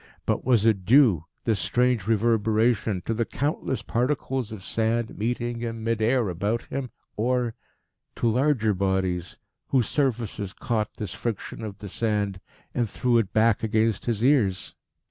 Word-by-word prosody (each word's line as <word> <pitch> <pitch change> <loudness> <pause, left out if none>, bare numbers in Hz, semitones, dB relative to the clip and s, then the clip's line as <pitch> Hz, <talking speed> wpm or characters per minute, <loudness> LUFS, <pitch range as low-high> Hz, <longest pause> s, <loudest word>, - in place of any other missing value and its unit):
But - - 0
was 120 -4 +3
it 105 -4 +3
due, 110 - +5 0.2
this 110 -4 +1
strange 125 -3 +1
reverberation, 110 -2 +2
to 115 - 0
the 115 +1 0
countless 140 +1 -2
particles 130 -1 -1
of 105 -4 -8
sand 115 +2 -1
meeting 120 +1 -2
in 115 -1 -4
mid 115 -1 0
air 120 0 +2
about 100 +6 -1
him, 135 -2 -4 0.3
or 120 +1 +1 0.6
to - - 0
larger 120 -2 +2
bodies, 95 -2 -1 0.3
whose 130 -5 +2
surfaces 115 -8 -1
caught 110 -3 -2
this 105 -5 -4
friction 115 -1 -4
of 105 -3 -6
the 105 - -8
sand 100 -2 -1 0.3
and 120 -3 0
threw 120 +1 +2
it 100 -4 -1
back 110 0 +3
against 110 -1 +1
his 115 -2 0
ears? 110 -9 +2
115 Hz, 150 wpm, -25 LUFS, 105-120 Hz, 0.6 s, due